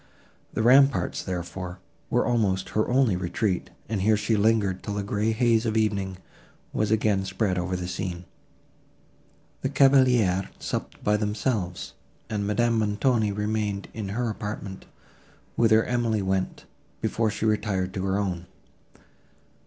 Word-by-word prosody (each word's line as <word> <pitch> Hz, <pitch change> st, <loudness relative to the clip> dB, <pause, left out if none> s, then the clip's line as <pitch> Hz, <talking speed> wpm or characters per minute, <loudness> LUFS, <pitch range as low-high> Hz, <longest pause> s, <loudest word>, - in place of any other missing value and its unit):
The 110 Hz, -, +1 dB
ramparts, 135 Hz, +3 st, +4 dB
therefore, 90 Hz, 0 st, -5 dB, 0.3 s
were -, -, +2 dB
almost 105 Hz, -6 st, +1 dB
her 110 Hz, -, 0 dB
only 125 Hz, -5 st, +3 dB
retreat, 90 Hz, +1 st, -1 dB, 0.2 s
and 105 Hz, -3 st, -2 dB
here 110 Hz, +2 st, +4 dB
she 105 Hz, +2 st, +1 dB
lingered, 100 Hz, -3 st, +2 dB
till 105 Hz, -, -4 dB
the 100 Hz, -, -2 dB
grey 105 Hz, +2 st, 0 dB
haze 115 Hz, 0 st, +2 dB
of 110 Hz, -1 st, 0 dB
evening 100 Hz, -4 st, 0 dB, 0.6 s
was 105 Hz, -, 0 dB
again 105 Hz, -2 st, +2 dB
spread 95 Hz, 0 st, -1 dB
over 90 Hz, +1 st, -2 dB
the 90 Hz, -1 st, -4 dB
scene. 90 Hz, -1 st, -4 dB, 1.4 s
The 135 Hz, -, -1 dB
cavaliers 125 Hz, -9 st, +4 dB
supped -, -, -5 dB
by 105 Hz, 0 st, +3 dB
themselves, 105 Hz, -3 st, -2 dB, 0.4 s
and 100 Hz, -2 st, -1 dB
Madame 115 Hz, +2 st, +2 dB
Montoni 110 Hz, +1 st, +1 dB
remained 105 Hz, -1 st, -2 dB
in 105 Hz, -4 st, -5 dB
her 120 Hz, +4 st, -1 dB
apartment, 105 Hz, -2 st, -6 dB, 0.7 s
whither 110 Hz, -1 st, +4 dB
Emily 115 Hz, -4 st, 0 dB
went, 95 Hz, 0 st, -2 dB, 0.3 s
before 115 Hz, -1 st, 0 dB
she 110 Hz, +1 st, -3 dB
retired 100 Hz, -4 st, 0 dB
to 95 Hz, -1 st, -3 dB
her 95 Hz, 0 st, +1 dB
own. 90 Hz, -3 st, -2 dB
105 Hz, 135 wpm, -26 LUFS, 95-110 Hz, 1.4 s, ramparts